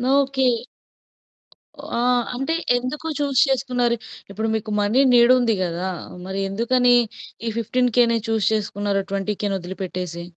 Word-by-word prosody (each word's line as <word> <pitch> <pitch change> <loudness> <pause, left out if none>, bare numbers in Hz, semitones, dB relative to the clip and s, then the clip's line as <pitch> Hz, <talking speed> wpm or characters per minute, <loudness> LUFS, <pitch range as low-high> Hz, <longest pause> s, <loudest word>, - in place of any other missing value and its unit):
Okay. 270 -2 +2 1.5
ఆహ్, 245 0 +2
అంటే 270 +6 -1 0.2
ఎందుకు 255 +6 -4
చూస్ 280 -3 +1
చేసుకున్నారు? 250 -2 +1 0.4
ఇప్పుడు 220 +3 -2
మీకు 215 0 -4
మనీ 215 +6 +3
నీడ్ 240 +1 +7
ఉంది 230 -3 +2
గదా! 175 +1 -3 0.4
మరి 190 +1 -4
ఎందుకని 245 +4 +3 0.5
ఈ - - +1
15,000 235 0 +2
చూస్ 220 -2 +1
చేసుకున్నారు 205 -1 -1
20,000 200 0 -2
ఒదిలి 180 +2 -8
పెట్టేసి? 180 -2 -5
230 Hz, 120 wpm, -22 LUFS, 200-250 Hz, 1.5 s, నీడ్